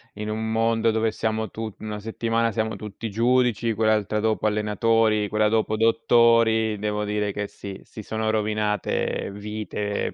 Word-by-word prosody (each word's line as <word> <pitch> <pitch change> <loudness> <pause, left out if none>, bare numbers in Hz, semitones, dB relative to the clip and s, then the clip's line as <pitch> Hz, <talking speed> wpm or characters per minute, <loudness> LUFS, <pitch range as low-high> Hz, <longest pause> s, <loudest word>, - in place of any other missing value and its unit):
in 105 +1 -5
un 110 +1 -2
mondo 115 0 +2
dove 110 0 +1
siamo 110 -1 -2
tu 110 -2 -6
una 105 -1 -5
settimana 115 +1 -1
siamo 110 0 -2
tutti 105 +1 -6
giudici, 120 0 +2
quell'altra 105 -1 +1
dopo 110 0 0
allenatori, 105 0 +2
quella 105 +1 +2
dopo 110 -1 +1
dottori, 115 -1 +3
devo 105 0 -2
dire 105 -1 -1
che 105 -1 -3
sì 100 -1 -9
si 110 - -10
sono 110 +1 -2
rovinate 105 -2 -1
vite 105 0 -4
110 Hz, 150 wpm, -24 LUFS, 105-115 Hz, -, dottori